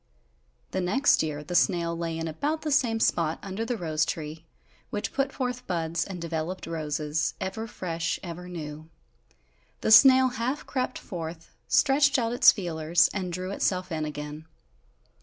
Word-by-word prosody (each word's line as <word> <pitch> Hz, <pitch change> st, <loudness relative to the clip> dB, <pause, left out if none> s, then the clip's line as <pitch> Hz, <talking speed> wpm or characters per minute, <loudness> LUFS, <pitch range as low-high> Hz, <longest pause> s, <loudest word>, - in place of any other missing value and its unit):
The 190 Hz, -, -1 dB
next 235 Hz, +11 st, +3 dB
year 150 Hz, -2 st, -3 dB
the 170 Hz, +4 st, -6 dB
snail 170 Hz, -2 st, +2 dB
lay 165 Hz, -1 st, -3 dB
in 165 Hz, 0 st, -3 dB
about 290 Hz, -, -2 dB
the 305 Hz, -, -2 dB
same 235 Hz, -5 st, +2 dB
spot 165 Hz, -6 st, +1 dB
under 200 Hz, +2 st, -4 dB
the 240 Hz, +1 st, -2 dB
rose 155 Hz, -4 st, 0 dB
tree, 155 Hz, +1 st, -5 dB, 0.4 s
which 205 Hz, -, -3 dB
put 275 Hz, 0 st, 0 dB
forth 250 Hz, -1 st, -4 dB
buds 170 Hz, -1 st, -1 dB
and 190 Hz, -3 st, -7 dB
developed 170 Hz, +2 st, -4 dB
roses, 155 Hz, -1 st, -2 dB
ever 195 Hz, +4 st, -4 dB
fresh, 170 Hz, -5 st, -3 dB
ever 180 Hz, 0 st, -7 dB
new. 155 Hz, -2 st, -7 dB, 0.9 s
The -, -, +1 dB
snail 260 Hz, +3 st, +8 dB
half 255 Hz, +3 st, -3 dB
crept 255 Hz, -1 st, -2 dB
forth, 165 Hz, -2 st, -7 dB
stretched 285 Hz, 0 st, +4 dB
out 230 Hz, -2 st, 0 dB
its 245 Hz, -, +8 dB
feelers 165 Hz, -3 st, +1 dB
and 185 Hz, -3 st, -3 dB
drew 185 Hz, +2 st, -4 dB
itself 185 Hz, -2 st, -1 dB
in 155 Hz, -1 st, -2 dB
again. 150 Hz, +1 st, -7 dB
175 Hz, 160 wpm, -27 LUFS, 160-225 Hz, 0.9 s, snail